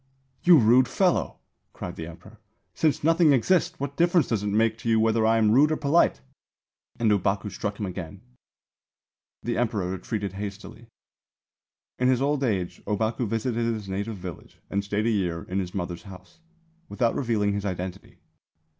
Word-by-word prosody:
'You 175 Hz, -2 st, +7 dB
rude 125 Hz, +1 st, +5 dB
fellow,' 185 Hz, -3 st, +1 dB, 0.4 s
cried 90 Hz, -, -7 dB
the 80 Hz, -, -6 dB
Emperor. 85 Hz, -, -13 dB, 0.3 s
'Since 155 Hz, -3 st, +1 dB
nothing 165 Hz, -1 st, +5 dB
exists, 165 Hz, +8 st, +2 dB
what 140 Hz, 0 st, -4 dB
difference 170 Hz, -1 st, +3 dB
does 110 Hz, -4 st, 0 dB
it 105 Hz, -, -3 dB
make 110 Hz, +2 st, +1 dB
to 115 Hz, -, -3 dB
you 110 Hz, -1 st, +4 dB
whether 110 Hz, 0 st, +2 dB
I 115 Hz, 0 st, +4 dB
am 110 Hz, -1 st, +3 dB
rude 145 Hz, +6 st, +5 dB
or 155 Hz, -, +1 dB
polite?' 145 Hz, -, +2 dB, 0.8 s
and 115 Hz, -2 st, +2 dB
Ōbaku 100 Hz, +1 st, 0 dB
struck 100 Hz, +1 st, -4 dB
him 105 Hz, -, -2 dB
again. 90 Hz, -4 st, -7 dB, 1.2 s
The 120 Hz, -1 st, -1 dB
Emperor 105 Hz, -6 st, -1 dB
retreated 100 Hz, +1 st, -4 dB
hastily." 105 Hz, +3 st, -8 dB, 1.1 s
In 125 Hz, -, +2 dB
his 130 Hz, -1 st, +3 dB
old 140 Hz, +1 st, 0 dB
age 95 Hz, -8 st, -2 dB
Ōbaku 110 Hz, +3 st, -1 dB
visited 115 Hz, +2 st, -1 dB
his 110 Hz, -3 st, -2 dB
native 100 Hz, +3 st, -3 dB
village 90 Hz, -3 st, -9 dB
and 100 Hz, 0 st, 0 dB
stayed 105 Hz, +2 st, -1 dB
a 115 Hz, -, +2 dB
year 90 Hz, -6 st, -1 dB
in 95 Hz, +2 st, -3 dB
his 90 Hz, -1 st, -5 dB
mother's 85 Hz, -2 st, -4 dB
house, 90 Hz, -, -14 dB, 0.5 s
without 120 Hz, -3 st, +1 dB
revealing 110 Hz, -5 st, 0 dB
his 100 Hz, 0 st, -3 dB
identity. 95 Hz, -1 st, -5 dB
110 Hz, 165 wpm, -26 LUFS, 95-125 Hz, 1.2 s, You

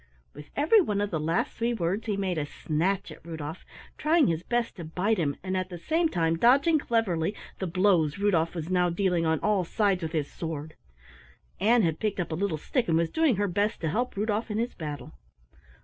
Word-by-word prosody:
With 150 Hz, -, -11 dB
every 325 Hz, +10 st, +5 dB
one 210 Hz, -, -1 dB
of 205 Hz, 0 st, -1 dB
the 160 Hz, -, -1 dB
last 165 Hz, +3 st, 0 dB
three 235 Hz, +1 st, 0 dB
words 195 Hz, +3 st, -2 dB
he 205 Hz, -2 st, 0 dB
made 185 Hz, -4 st, -1 dB
a 145 Hz, -, -3 dB
snatch 180 Hz, +8 st, -1 dB
at -, -, -12 dB
Rudolf, 160 Hz, -2 st, -6 dB, 0.4 s
trying 310 Hz, 0 st, +4 dB
his 165 Hz, -6 st, 0 dB
best 240 Hz, +4 st, -2 dB
to 170 Hz, -, -6 dB
bite 180 Hz, +6 st, 0 dB
him, 145 Hz, -4 st, 0 dB
and 190 Hz, 0 st, -2 dB
at 185 Hz, 0 st, -2 dB
the 175 Hz, -, -7 dB
same 320 Hz, -, +1 dB
time 165 Hz, -, +1 dB
dodging 280 Hz, -, +5 dB
cleverly 205 Hz, -, 0 dB, 0.2 s
the 190 Hz, -, -2 dB
blows 175 Hz, -4 st, +2 dB
Rudolf 180 Hz, -5 st, +1 dB
was 165 Hz, +1 st, -4 dB
now 180 Hz, -1 st, +3 dB
dealing 175 Hz, -2 st, +1 dB
on 160 Hz, -1 st, +2 dB
all 205 Hz, -3 st, +2 dB
sides 195 Hz, +1 st, +1 dB
with 160 Hz, 0 st, -4 dB
his 150 Hz, -3 st, 0 dB
sword. 160 Hz, -3 st, -5 dB, 0.9 s
Ann 225 Hz, +3 st, +4 dB
had 160 Hz, -2 st, 0 dB
picked 215 Hz, -3 st, -1 dB
up 175 Hz, -, -2 dB
a -, -, -1 dB
little 180 Hz, -2 st, -1 dB
stick 240 Hz, -, -1 dB
and 160 Hz, -, +3 dB
was 165 Hz, 0 st, 0 dB
doing 320 Hz, -7 st, +3 dB
her 205 Hz, +1 st, 0 dB
best 205 Hz, +4 st, 0 dB
to 160 Hz, -, 0 dB
help 245 Hz, +10 st, -1 dB
Rudolf 215 Hz, +2 st, -1 dB
in 210 Hz, -, -2 dB
his 235 Hz, +2 st, -1 dB
battle. 150 Hz, -3 st, -6 dB
185 Hz, 215 wpm, -27 LUFS, 165-220 Hz, 0.9 s, every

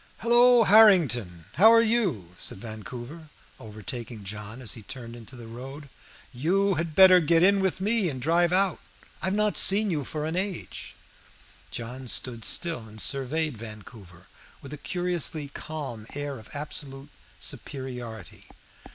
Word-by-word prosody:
"Hallo, 240 Hz, +1 st, +5 dB
Harrington, 155 Hz, -, +4 dB
how 210 Hz, +6 st, +8 dB
are 230 Hz, 0 st, +6 dB
you?" 195 Hz, -, 0 dB
said -, -, -4 dB
Vancouver, 120 Hz, -, -9 dB, 0.3 s
overtaking 110 Hz, +1 st, -7 dB
John 105 Hz, +3 st, -7 dB
as 115 Hz, -7 st, -4 dB
he 115 Hz, -, -8 dB
turned 120 Hz, 0 st, -9 dB
into 120 Hz, +2 st, -12 dB
the 120 Hz, -2 st, -11 dB
road. 135 Hz, +5 st, -9 dB, 0.4 s
"You 190 Hz, +10 st, +1 dB
had 160 Hz, -2 st, -3 dB
better 185 Hz, -1 st, +8 dB
get 165 Hz, +1 st, +3 dB
in 200 Hz, +1 st, +5 dB
with 190 Hz, -2 st, 0 dB
me 210 Hz, -1 st, +2 dB
and 130 Hz, -4 st, -6 dB
drive 170 Hz, +5 st, +2 dB
out. 190 Hz, -1 st, +1 dB, 0.4 s
I -, -, -3 dB
have 190 Hz, +1 st, 0 dB
not 210 Hz, 0 st, +1 dB
seen 205 Hz, +1 st, +5 dB
you 150 Hz, -4 st, -1 dB
for 150 Hz, +2 st, -5 dB
an 160 Hz, +2 st, -3 dB
age." 190 Hz, -1 st, -5 dB, 0.7 s
John 125 Hz, +2 st, -7 dB
stood 120 Hz, -1 st, -2 dB
still 120 Hz, -, -1 dB
and 110 Hz, 0 st, -12 dB
surveyed 140 Hz, +1 st, -1 dB
Vancouver 105 Hz, -5 st, -12 dB, 0.3 s
with 140 Hz, +1 st, -11 dB
a -, -, -6 dB
curiously 175 Hz, -5 st, -1 dB
calm 140 Hz, -8 st, -7 dB
air 145 Hz, -3 st, -5 dB
of 110 Hz, -, -16 dB
absolute 145 Hz, -1 st, -4 dB, 0.3 s
superiority. 125 Hz, -, -6 dB
145 Hz, 150 wpm, -26 LUFS, 115-180 Hz, 0.7 s, how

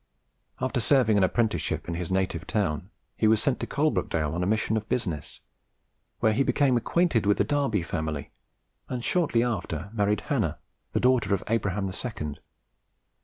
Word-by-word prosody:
After 130 Hz, 0 st, 0 dB
serving 120 Hz, -2 st, +4 dB
an -, -, +3 dB
apprenticeship 105 Hz, -3 st, 0 dB
in 85 Hz, -, -2 dB
his 85 Hz, +1 st, -4 dB
native 90 Hz, -4 st, -1 dB
town, 90 Hz, -3 st, -1 dB, 0.3 s
he 110 Hz, -, +2 dB
was 110 Hz, 0 st, +5 dB
sent 130 Hz, +2 st, 0 dB
to -, -, -3 dB
Coalbrookdale 90 Hz, -, 0 dB
on 85 Hz, -, -2 dB
a 90 Hz, -, 0 dB
mission 110 Hz, +1 st, +1 dB
of 110 Hz, 0 st, -3 dB
business, 85 Hz, -, -3 dB, 0.8 s
where 110 Hz, -, +4 dB
he 130 Hz, -, +1 dB
became 135 Hz, -1 st, +3 dB
acquainted 120 Hz, -, +2 dB
with 105 Hz, -, +4 dB
the -, -, +3 dB
Darby 140 Hz, -, 0 dB
family, 80 Hz, -4 st, -3 dB, 0.6 s
and 125 Hz, -2 st, -3 dB
shortly 150 Hz, -10 st, +2 dB
after 100 Hz, -6 st, -3 dB
married 105 Hz, -1 st, +1 dB
Hannah, 110 Hz, -, -1 dB, 0.4 s
the -, -, +2 dB
daughter 120 Hz, -6 st, +3 dB
of 95 Hz, -, -6 dB
Abraham 100 Hz, -3 st, 0 dB
the 95 Hz, -, -3 dB
second. 75 Hz, -, -5 dB
105 Hz, 170 wpm, -27 LUFS, 90-125 Hz, 0.8 s, was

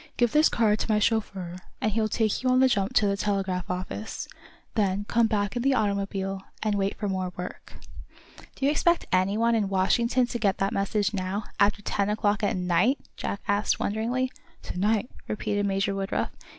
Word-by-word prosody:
"Give 240 Hz, -2 st, +3 dB
this 305 Hz, +4 st, +5 dB
card 215 Hz, -2 st, +2 dB
to -, -, -2 dB
my 215 Hz, -, +4 dB
chauffeur, 195 Hz, -5 st, -1 dB, 0.2 s
and 215 Hz, -, 0 dB
he'll 220 Hz, +1 st, +1 dB
take 215 Hz, 0 st, 0 dB
you 255 Hz, -, +1 dB
on 255 Hz, 0 st, +4 dB
the 265 Hz, -, +6 dB
jump 200 Hz, -5 st, 0 dB
to 210 Hz, -, +5 dB
the 200 Hz, 0 st, +2 dB
telegraph 195 Hz, -3 st, -1 dB
office. 185 Hz, +4 st, -4 dB, 0.5 s
Then 200 Hz, -2 st, 0 dB
come 235 Hz, -1 st, +3 dB
back 205 Hz, 0 st, -1 dB
in 240 Hz, -, -1 dB
the 270 Hz, +1 st, +3 dB
automobile, 195 Hz, -2 st, -1 dB, 0.2 s
and 215 Hz, -1 st, +1 dB
wait 200 Hz, -1 st, 0 dB
for 210 Hz, -, -2 dB
more 185 Hz, -2 st, -2 dB
work." 180 Hz, 0 st, -7 dB, 0.8 s
"Do 270 Hz, -, -2 dB
you 285 Hz, -, +4 dB
expect 340 Hz, +3 st, +2 dB
anyone 205 Hz, +6 st, +2 dB
in 210 Hz, -4 st, +1 dB
Washington 235 Hz, +6 st, +2 dB
to 240 Hz, 0 st, -4 dB
get 200 Hz, -4 st, +1 dB
that 195 Hz, +1 st, 0 dB
message 205 Hz, +1 st, 0 dB
now, 195 Hz, +2 st, -2 dB, 0.2 s
after 205 Hz, +1 st, +3 dB
ten 200 Hz, 0 st, 0 dB
o'clock 210 Hz, 0 st, +1 dB
at 205 Hz, -3 st, +1 dB
night?" 180 Hz, +9 st, +2 dB, 0.2 s
Jack 200 Hz, -, -4 dB
asked, 205 Hz, +1 st, +1 dB
wonderingly. 240 Hz, +5 st, -1 dB, 0.3 s
"To -, -, -5 dB
night?" 210 Hz, +3 st, +1 dB, 0.2 s
repeated 205 Hz, -1 st, -1 dB
Major 195 Hz, 0 st, 0 dB
Woodruff. 195 Hz, 0 st, -2 dB
205 Hz, 190 wpm, -27 LUFS, 195-225 Hz, 0.8 s, the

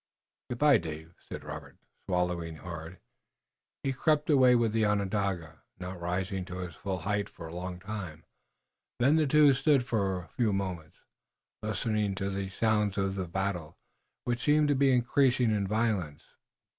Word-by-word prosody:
"Good 125 Hz, -, -3 dB
by, 145 Hz, +1 st, +5 dB
Dave," 80 Hz, 0 st, -7 dB, 0.2 s
said -, -, -6 dB
Robert, -, -, -8 dB, 0.3 s
swallowing 90 Hz, -3 st, -1 dB
hard. 85 Hz, +1 st, -8 dB, 0.9 s
He 135 Hz, -, 0 dB
crept 150 Hz, +3 st, +2 dB
away 130 Hz, -3 st, +6 dB
with 115 Hz, -2 st, +2 dB
the 110 Hz, 0 st, +1 dB
Onondaga, 100 Hz, -5 st, -1 dB, 0.2 s
not 90 Hz, 0 st, -6 dB
rising 95 Hz, +2 st, -2 dB
to 90 Hz, 0 st, -7 dB
his 90 Hz, -2 st, -6 dB
full 95 Hz, +3 st, -4 dB
height 100 Hz, +3 st, -1 dB
for 85 Hz, -, -10 dB
a 80 Hz, -, -9 dB
long 90 Hz, +1 st, -5 dB
time. 95 Hz, -6 st, -6 dB, 0.7 s
Then 140 Hz, +5 st, +4 dB
the 155 Hz, -2 st, +3 dB
two 150 Hz, 0 st, +6 dB
stood 135 Hz, -1 st, +3 dB
for 100 Hz, -6 st, 0 dB
a 90 Hz, -1 st, -8 dB
few 115 Hz, -4 st, 0 dB
moments, 90 Hz, -5 st, -4 dB, 0.6 s
listening 105 Hz, -2 st, -1 dB
to 100 Hz, 0 st, -2 dB
the 95 Hz, 0 st, -3 dB
sounds 105 Hz, 0 st, +1 dB
of 95 Hz, -1 st, 0 dB
the 95 Hz, -2 st, -3 dB
battle, 90 Hz, -3 st, -3 dB, 0.5 s
which 120 Hz, 0 st, -1 dB
seemed 150 Hz, 0 st, +4 dB
to 145 Hz, -, +3 dB
be 135 Hz, 0 st, +4 dB
increasing 125 Hz, -1 st, +3 dB
in 100 Hz, -2 st, 0 dB
violence. 105 Hz, -8 st, -1 dB
100 Hz, 160 wpm, -30 LUFS, 90-120 Hz, 0.9 s, away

